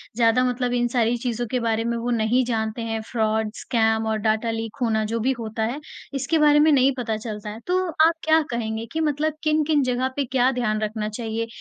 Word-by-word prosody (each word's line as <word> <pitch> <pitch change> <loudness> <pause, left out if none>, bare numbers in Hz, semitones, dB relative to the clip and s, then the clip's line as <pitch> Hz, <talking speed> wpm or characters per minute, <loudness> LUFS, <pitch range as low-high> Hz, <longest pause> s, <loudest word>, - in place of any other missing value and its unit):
ज़्यादा 235 +1 +3
मतलब 250 0 -1
इन 240 0 +1
सारी 240 -1 +1
चीज़ों 240 0 -2
के 250 - +1
बारे 225 -1 0
में 235 0 -1
वो 235 +1 -3
नहीं 235 +4 +2
जानते 220 -1 -2
हैं, 225 -1 -2
फ्रॉड, 220 -1 0
स्कैम 220 -2 +1
और 220 0 0
डाटा 220 +1 +1
लीक 225 -1 -4
होना 220 -2 +1
जो 230 - 0
भी 260 +4 +1
होता 220 0 -3
है, 245 +7 -2 0.3
इसके 275 +4 0
बारे 295 0 +5
में 310 +1 +5
नहीं 270 -1 +4
पता 225 -3 -2
चलता 210 -1 -6
है। 215 +2 -7
तो 370 0 +1 0.2
आप 335 - +2
क्या 315 0 +4
कहेंगे 225 -1 -3
कि 320 - -1
मतलब 300 0 0
किन-किन 305 -1 +2
जगह 255 +1 0
पे 280 -1 0
क्या 255 +1 +2
ध्यान 215 -4 -1
रखना 215 0 -2
चाहिए? 225 0 -3
235 Hz, 215 wpm, -23 LUFS, 220-260 Hz, 0.3 s, बारे